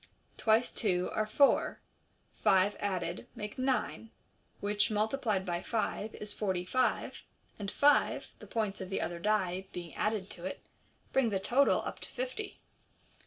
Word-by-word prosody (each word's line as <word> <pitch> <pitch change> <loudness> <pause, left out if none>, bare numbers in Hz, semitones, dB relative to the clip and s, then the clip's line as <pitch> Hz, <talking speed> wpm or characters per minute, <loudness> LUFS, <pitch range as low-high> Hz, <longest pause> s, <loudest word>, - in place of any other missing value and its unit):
Twice 225 +2 +3
two 180 -4 0
are 215 0 0
four, 275 +6 +3 0.5
five 190 +2 +3
added 180 -4 -2
make 210 +3 -6
nine, 255 -3 0 0.5
which, 205 +2 +1
multiplied 215 -2 0
by 175 -1 -1
five, 220 -1 -2
is 210 -1 -2
forty 190 -4 -1
five, 255 +6 0 0.4
and 200 -1 -3
five 290 +7 +3
(the - - -11
points 210 -3 -1
of 185 - -5
the 195 - -1
other 170 +1 -3
die) 190 -2 0
being 170 -4 -7
added 210 +1 -1
to 175 - -7
it, 190 - -5 0.5
bring 265 -4 +4
the 195 -2 0
total 255 +8 +3
up - - -5
to - - -8
fifty. - - -4
210 Hz, 150 wpm, -32 LUFS, 185-225 Hz, 0.5 s, bring